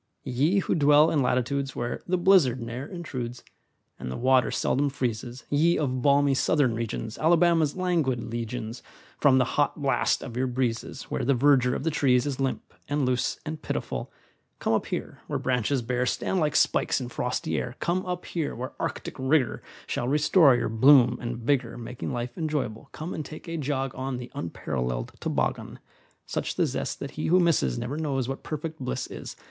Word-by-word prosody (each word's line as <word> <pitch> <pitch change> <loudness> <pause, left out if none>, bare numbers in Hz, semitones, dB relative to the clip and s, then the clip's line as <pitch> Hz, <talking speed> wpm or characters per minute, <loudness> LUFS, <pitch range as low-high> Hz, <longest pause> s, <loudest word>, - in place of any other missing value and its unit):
Ye 145 +10 +2
who - - 0
dwell 150 0 +5
in 150 - +2
latitudes 130 +2 0
Where 120 0 -3
"the 185 +1 +2
blizzard" 175 -9 +4
ne'er 120 +4 -5
intrudes, 130 -9 -6 0.6
And 65 - -5
the - - -4
water 130 0 +3
seldom 140 +2 +1
freezes; 125 -2 -3
Ye 160 +4 +3
of 130 -4 -1
balmy 140 +1 +4
Southern 135 -2 +2
regions, 115 -1 -4
Alabama's 165 -2 +3
languid 165 -10 0
legions, 115 0 -5 0.4
From 135 -3 +5
the 130 - +4
"hot 145 +4 0
blast" 135 -4 +1
of 120 - -7
your 130 +1 0
breezes, 120 -2 -2
Where - - -1
the 140 +2 +3
verdure 125 -1 +4
of - - -4
the 165 - +1
trees 125 -4 +3
is 140 -2 -3
Limp, 135 -1 -2 0.2
and 145 -1 +1
loose, 125 -1 0
and 155 0 -5
pitiful, - - -4 0.5
Come - - 0
up - - 0
here - - -4
where - - -1
branches 125 +1 0
bare 125 +1 0
Stand 190 - 0
like 150 -3 0
spikes - - +3
in 125 - -4
frosty 125 0 -2
air; 125 0 -5
Come 180 +2 0
up 180 0 -3
here 160 -4 -3
where 125 +2 -5
arctic - - -3
rigor 130 -2 +1 0.2
Shall 120 - -2
restore 150 0 +5
your 120 - 0
bloom 125 +3 +6
and 120 0 -3
vigor, 120 0 0
Making 120 +1 -6
life 120 0 -4
enjoyable; 150 -9 -2
Come 160 +4 -6
and 155 - -4
take 155 +4 -10
a 165 - -4
jog 135 -4 -2
on 130 0 -3
The 125 0 -8
unparalleled 60 -7 -3
toboggan! - - -2 0.5
Such - - -3
the - - +2
zest - - -3
that - - -5
he - - -3
who 180 +3 +5
misses 150 - +2
Never 140 +4 -3
knows 135 -5 -1
what 135 0 -4
perfect 155 +1 -5
bliss 60 - -3
is. - - -8
130 Hz, 185 wpm, -27 LUFS, 120-150 Hz, 0.6 s, bloom